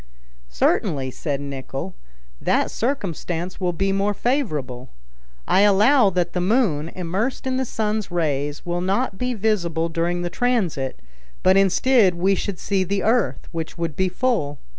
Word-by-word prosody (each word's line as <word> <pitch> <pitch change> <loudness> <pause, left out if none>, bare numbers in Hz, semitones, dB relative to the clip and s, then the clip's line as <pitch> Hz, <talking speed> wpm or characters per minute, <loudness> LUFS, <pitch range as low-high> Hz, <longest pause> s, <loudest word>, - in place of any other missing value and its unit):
"Certainly," 130 - 0
said 140 +1 -3
Nicholl, 135 -7 -5 0.5
"that - - +1
circumstance 180 - -3
will 180 -2 0
be 195 +3 0
more 200 +1 0
favorable. 150 - -2 0.6
I - - +4
allow 210 +4 +5
that 175 -2 -1
the 180 - 0
moon, 180 - +1
immersed 190 +10 -2
in 260 -1 0
the 260 - 0
sun's 215 -3 -2
rays, 145 -4 -1
will 175 0 -2
not 195 +2 -1
be 250 0 -1
visible 175 -6 0
during 170 +2 -1
the 175 - -3
transit, 185 - -1 0.4
but 185 +1 +5
instead 195 +1 +4
we 190 +3 +2
should 195 -1 -3
see 195 +1 0
the 195 +2 -1
earth, 230 0 +1
which 165 -2 -5
would 165 -3 -3
be 190 0 +1
full. 180 - -1
185 Hz, 150 wpm, -22 LUFS, 165-215 Hz, 0.6 s, allow